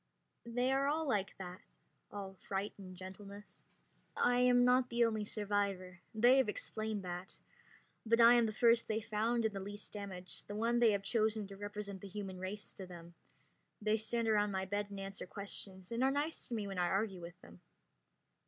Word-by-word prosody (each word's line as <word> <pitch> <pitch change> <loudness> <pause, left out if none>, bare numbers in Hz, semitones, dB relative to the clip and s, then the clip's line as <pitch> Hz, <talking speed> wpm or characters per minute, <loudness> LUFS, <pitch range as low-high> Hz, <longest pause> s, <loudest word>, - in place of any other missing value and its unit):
They 245 +2 +1
are 285 +4 +2
like 205 -8 0
that, 180 -1 -7 0.5
all 195 -2 -6
fright 195 +2 -3
and 185 -2 -9
gentleness. 200 +2 -10 0.6
I 245 0 +3
am 245 0 +5
not 250 0 +4
the 235 0 +3
only 220 -2 0
survivor 200 -3 -1 0.2
they 240 +4 +6
have 265 -5 +3
explained 215 -1 -3
that 180 +1 -6 0.6
but 230 +1 +3
I 235 +1 +9
am 240 -2 +5
the - - -1
first 230 +1 +4
they 220 0 0
found, 225 +2 0
and 215 -2 0
the - - -2
least 205 +2 -7
damaged, 190 -3 -7
the 205 - -5
one 230 +2 +2
they 235 -2 +6
have 200 -1 -1
chosen 215 0 +1
to 195 - -8
represent 205 -1 -6
the 200 - -7
human 195 -1 -6
race 195 +3 -5
to 190 - -8
them. 170 -1 -11 0.7
They 215 0 +2
stand 230 +1 0
around 210 -1 +3
my 190 -1 -1
bed 205 +1 -1
and 200 -1 -7
answer 195 -1 -6
questions, 195 -1 -6
and 235 +2 0
are 265 - +5
nice 290 +4 -1
to 240 - -3
me 215 -2 -2
when 195 -2 -4
I 175 - +3
argue 195 0 0
with 175 +1 -9
them. 85 0 -15
205 Hz, 190 wpm, -35 LUFS, 195-230 Hz, 0.7 s, I